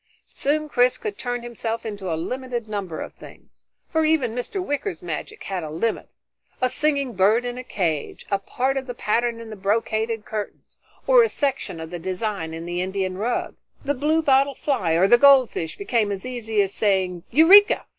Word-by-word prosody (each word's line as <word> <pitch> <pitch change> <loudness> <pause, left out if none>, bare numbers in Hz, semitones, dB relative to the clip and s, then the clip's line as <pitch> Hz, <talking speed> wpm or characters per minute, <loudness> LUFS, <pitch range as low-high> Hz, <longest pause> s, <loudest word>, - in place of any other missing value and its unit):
Soon 305 +2 -1
Chris 250 -3 +2
could 205 - -5
turn 245 -1 -3
himself 230 -1 -4
into 200 -4 -4
a 160 - -1
limited 245 +5 -4
number 200 -6 -4
of - - -7
things, - - -16 0.3
for 320 0 +1
even 310 -7 +2
Mr. 245 - -4
Wicker's 285 - -3
magic 165 -3 -6
had 190 -2 -3
a 155 - -5
limit: 175 +9 -2 0.5
a 255 - +2
singing 280 -3 0
bird 210 +5 +3
in 245 0 -3
a - - -6
cage, 165 - -3
a 200 - +2
part 260 +7 -1
of 265 0 -4
the 245 - -5
pattern 235 +1 0
in 230 -1 -9
the - - -6
brocaded 220 +2 -1
curtains, 210 -1 -7 0.3
or - - +6
a 455 - +3
section 275 - -2
of 160 +1 -7
the 175 - -5
design 185 -1 -3
in 165 +1 -6
the 175 +1 -2
Indian 190 0 -2
rug. 225 +6 -2 0.3
The 285 - +1
bluebottle 285 -1 +2
fly 195 - 0
or 175 +4 +4
the 240 +3 +6
goldfish 260 - +4
became 235 - 0
as 195 +3 -4
easy 225 -4 0
as 195 0 -4
saying 190 -4 0
"Eureka!" 370 - +7
230 Hz, 185 wpm, -23 LUFS, 190-265 Hz, 0.5 s, Eureka